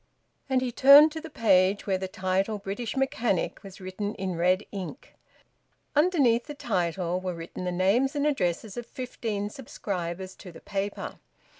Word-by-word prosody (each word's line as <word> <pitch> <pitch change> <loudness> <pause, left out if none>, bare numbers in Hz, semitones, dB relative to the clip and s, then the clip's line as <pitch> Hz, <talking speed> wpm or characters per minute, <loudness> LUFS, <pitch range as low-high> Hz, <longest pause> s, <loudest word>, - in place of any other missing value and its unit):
And 260 -1 +2
he 255 -1 -1
turned 280 +5 +8
to 320 +1 -6
the 325 - -8
page 195 -6 +3
where 190 -2 0
the 190 - -3
title 190 +3 -1
`British 205 +5 -4
Mechanic' 245 -7 0
was 195 0 -11
written 195 +2 -4
in 185 -2 -3
red 180 +4 +2
ink. 200 +6 -7 0.8
Underneath 285 -7 +3
that 295 -2 -7
title 180 - -1
were 185 -1 -3
written 165 +2 -7
the 180 - -1
names 205 - +2
and 290 0 +1
addresses 205 - -1
of 240 - -5
fifteen 220 -5 -4
subscribers 185 -7 -5
to 185 - -10
the 165 - -12
paper. 200 0 -4
200 Hz, 160 wpm, -27 LUFS, 185-250 Hz, 0.8 s, turned